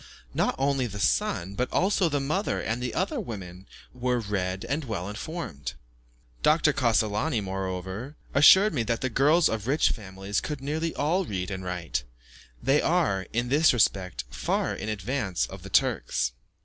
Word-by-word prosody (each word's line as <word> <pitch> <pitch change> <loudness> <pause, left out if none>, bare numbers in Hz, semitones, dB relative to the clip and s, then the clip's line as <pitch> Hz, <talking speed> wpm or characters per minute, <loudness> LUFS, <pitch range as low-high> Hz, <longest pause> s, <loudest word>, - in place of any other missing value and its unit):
Not - - +1
only 135 -2 +1
the 100 -2 -7
son, 95 -1 +1
but 125 +5 -2
also 190 -2 +2
the 145 -1 0
mother 155 +9 -1
and 115 +2 -2
the 125 -2 -3
other 220 +10 0
women, 95 - -7 0.3
were 125 -1 0
read 95 -3 -2
and 150 +3 -1
well 100 -8 -4
informed. 105 - -5 0.7
Dr. 155 0 +4
Cassolani, 115 +2 +1
moreover, 95 - -4 0.2
assured 190 +9 +7
me 130 - 0
that 115 0 -1
the 130 - -1
girls 155 +7 +4
of 110 0 -3
rich 145 +4 +3
families 95 -1 -3
could 150 -2 -4
nearly 155 +4 -2
all 170 +7 +1
read 95 - -3
and 95 -1 -4
write. 85 -8 -3 0.6
They 135 +4 +4
are, 155 - +1
in 120 +2 -1
this 150 +3 +5
respect, 95 - +1
far - - -1
in 110 - -5
advance 100 - -1
of - - -10
the - - -9
Turks. - - +1
115 Hz, 160 wpm, -27 LUFS, 95-145 Hz, 0.7 s, assured